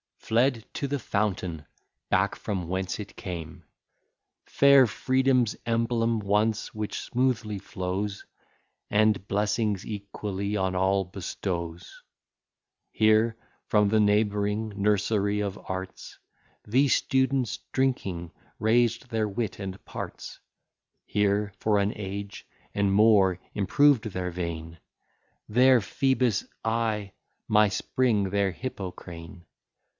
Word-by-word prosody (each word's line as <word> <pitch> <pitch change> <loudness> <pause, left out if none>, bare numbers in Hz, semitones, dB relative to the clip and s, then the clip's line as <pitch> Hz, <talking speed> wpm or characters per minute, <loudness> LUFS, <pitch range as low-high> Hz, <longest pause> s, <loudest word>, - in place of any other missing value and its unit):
Fled 115 0 +1
to 140 - -2
the 145 +1 -1
fountain 95 - -2 0.4
back, - - +2
from 95 -5 -4
whence 95 +1 -2
it 100 - -10
came! 85 -4 -7 0.8
Fair 140 -2 +6
Freedom's 130 0 +2
emblem 115 0 +1
once, 105 +2 0
which 110 -1 -4
smoothly 120 -5 -1
flows, 95 +3 -4 0.6
And 105 -1 +2
blessings 105 -1 0
equally 100 -1 -4
on 95 -2 0
all 95 +1 +2
bestows. 90 -2 -5 0.9
Here, 110 +1 +3 0.3
from 105 -1 +3
the 110 +1 +3
neighbouring 105 +1 +1
nursery 105 0 +1
of 100 -1 -3
arts, 95 0 -6 0.5
The 130 +7 +3
students, 130 -2 +1
drinking, 95 -11 -1 0.3
raised 115 +2 +2
their 110 -2 0
wit 105 0 -3
and 95 -1 -6
parts; - - -7 0.7
Here, 100 0 +1
for 105 -1 +2
an 100 +1 +2
age 100 0 -6 0.3
and 100 -1 +1
more, 100 -3 +5 0.2
improved 130 +4 +3
their 90 -4 -3
vein, 85 -2 -5 0.7
Their 125 +2 +5
Phoebus 130 -2 +1 0.2
I, 110 -3 -1 0.4
my 105 0 +5
spring 105 0 0
their 100 0 +1
Hippocrene. 90 -5 -8
105 Hz, 105 wpm, -27 LUFS, 95-115 Hz, 0.9 s, Fair